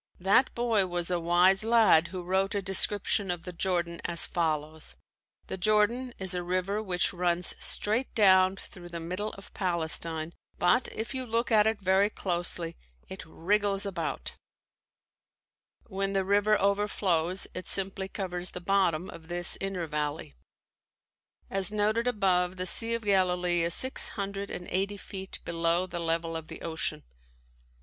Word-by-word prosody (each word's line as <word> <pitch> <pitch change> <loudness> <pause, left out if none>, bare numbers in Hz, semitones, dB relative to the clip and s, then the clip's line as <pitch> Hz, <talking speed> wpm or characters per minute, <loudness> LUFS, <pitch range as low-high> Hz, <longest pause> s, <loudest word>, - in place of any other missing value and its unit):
That 195 +8 +3
boy 230 -5 +1
was 175 0 -1
a 175 - +1
wise 180 +4 +4
lad 220 -8 +4
who 180 +1 -7
wrote 190 +3 0
a 200 - 0
description 195 +1 +2
of 175 -2 -3
the 180 - -8
Jordan 170 -1 -2
as 170 -1 +2
follows: 155 -2 -3 0.5
"The 190 - -6
Jordan 215 +5 +1
is 190 -1 -2
a 180 - -2
river 185 +4 -2
which 180 -4 0
runs 175 -1 +1
straight 225 +5 0
down 190 -3 +5
through 175 -2 -12
the 170 -1 -6
middle 180 +6 -4
of 195 - -13
Palestine, 165 -2 -2 0.2
but 245 +8 +2
if 225 +4 -5
you 260 -1 -3
look 230 0 -1
at 215 -1 +5
it 220 -1 0
very 190 +1 +2
closely, 175 -3 -1 0.3
it 190 - -8
wriggles 200 +4 0
about." 175 -5 -4 1.5
When 195 -1 -3
the 195 -1 0
river 205 +1 +2
overflows 195 -3 +1
it 185 - -7
simply 195 0 0
covers 180 -2 -2
the - - -7
bottom 180 -2 +1
of 160 -1 -12
this 175 +1 +3
inner 195 -3 -3
valley. 150 - -4 1.1
As 195 0 +2
noted 215 +3 0
above, 185 -5 +1
the 185 - -3
Sea 230 +6 +3
of 230 - -5
Galilee 180 -3 +1
is 170 0 +1
six 260 0 +3
hundred 200 0 -4
and 180 - -6
eighty 195 +2 -1
feet 190 -1 -6
below 170 +1 0
the 175 -1 -6
level 165 0 -1
of 160 -1 -6
the - - -10
ocean. 160 - -2
185 Hz, 155 wpm, -28 LUFS, 175-205 Hz, 1.5 s, down